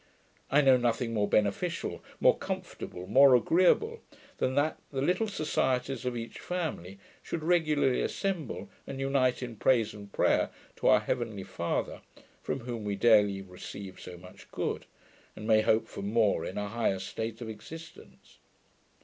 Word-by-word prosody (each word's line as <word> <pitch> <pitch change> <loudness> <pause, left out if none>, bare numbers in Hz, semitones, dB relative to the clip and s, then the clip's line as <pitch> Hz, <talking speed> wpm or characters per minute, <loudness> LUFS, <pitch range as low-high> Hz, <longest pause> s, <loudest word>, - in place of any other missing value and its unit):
I 150 - +5
know 135 -2 +6
nothing 120 -1 0
more 105 -2 +1
beneficial, 105 - 0 0.2
more - - +5
comfortable, 90 0 -6
more 135 +4 +7
agreeable, 185 - +3 0.4
than 130 0 0
that 145 +2 +1
the 135 - -4
little 180 +10 +1
societies 135 -8 -1
of 125 -1 -1
each 115 0 -7
family 155 - -4 0.2
should 165 - -5
regularly 155 -6 +2
assemble, 190 -6 -3 0.2
and 135 - -6
unite 135 -2 +1
in 120 -3 -6
praise 115 -4 +2
and 100 -1 -11
prayer - - +2 0.3
to - - 0
our - - +6
heavenly - - -3
Father, - - -3 0.4
from 135 - -3
whom 120 -2 -5
we 100 -1 -2
daily 105 -3 +4
receive 95 +1 -9
so 90 -1 -9
much 90 +3 -14
good, - - -3 0.5
and 110 - -8
may 110 -1 +5
hope 110 0 +2
for - - -8
more 105 +1 +2
in - - -6
a 105 0 -2
higher 115 -3 0
state 110 +4 -5
of 120 - -6
existence. 155 +10 -11
120 Hz, 155 wpm, -30 LUFS, 105-145 Hz, 0.5 s, more